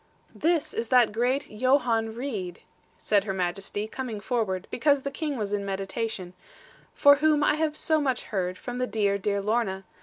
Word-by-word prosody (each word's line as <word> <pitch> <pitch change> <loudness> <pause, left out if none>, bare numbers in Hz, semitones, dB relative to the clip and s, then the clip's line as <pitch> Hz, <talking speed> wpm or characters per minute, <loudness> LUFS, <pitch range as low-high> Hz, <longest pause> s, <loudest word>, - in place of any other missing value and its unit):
'This 330 -1 0
is 230 - -2
that 245 -2 +5
great 250 +6 0
Johann 230 -1 +1
Reed,' 210 -9 -5 0.3
said 205 -1 +1
Her 195 - -2
Majesty, 195 +3 -2
coming 230 -2 -5
forward, 200 -5 -2
because 280 +1 +2
the 280 - -3
King 295 -2 -3
was 205 -2 -3
in 205 -1 -1
meditation; 195 -1 -4 0.6
'for 285 -1 +7
whom 300 0 +3
I - - +4
have 310 -1 -1
so 315 -2 +1
much 260 -4 0
heard, 185 -3 -2
from 245 +4 -6
the 250 - 0
dear, 200 -3 0
dear 200 0 -1
Lorna. 210 -3 0
225 Hz, 175 wpm, -27 LUFS, 200-270 Hz, 0.6 s, for